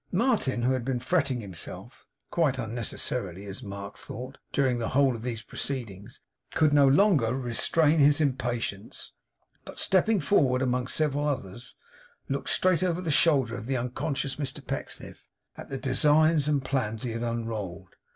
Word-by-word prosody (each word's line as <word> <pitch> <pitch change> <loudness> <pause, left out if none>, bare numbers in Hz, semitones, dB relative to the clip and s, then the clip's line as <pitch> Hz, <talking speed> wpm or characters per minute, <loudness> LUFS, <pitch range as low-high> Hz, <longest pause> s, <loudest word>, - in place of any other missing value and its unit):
Martin, 195 - +1
who 130 +2 +3
had 130 -2 -1
been 125 0 -1
fretting 135 -2 0
himself 95 -5 -9 0.2
quite 150 -6 +2
unnecessarily, 110 -4 -4
as 100 0 -7
Mark 100 0 -7
thought 130 +4 -8
during 130 -3 +1
the 115 - -2
whole 135 -1 +3
of 115 - -7
these 115 -2 -4
proceedings, 110 -9 -5 0.3
could 155 -2 +4
no 140 -1 +6
longer 140 - +4
restrain 145 +5 +2
his 145 +1 +5
impatience; 120 -7 -2 0.5
but - - -11
stepping 195 +3 +3
forward 135 -6 +3
among 125 0 0
several 145 0 0
others, 120 -4 -4 0.5
looked 140 0 -2
straight 185 -3 +3
over 180 -2 +1
the 170 -3 -2
shoulder 135 -6 +3
of 115 -1 -7
the 135 -1 0
unconscious 135 +3 -2
Mr 140 -3 -5
Pecksniff, - - -6 0.3
at - - -10
the 135 - -3
designs 150 +2 +3
and 145 -3 +1
plans 115 -5 -1
he 120 - -2
had 115 +1 -4
unrolled. 110 -6 -4
130 Hz, 155 wpm, -28 LUFS, 115-145 Hz, 0.5 s, no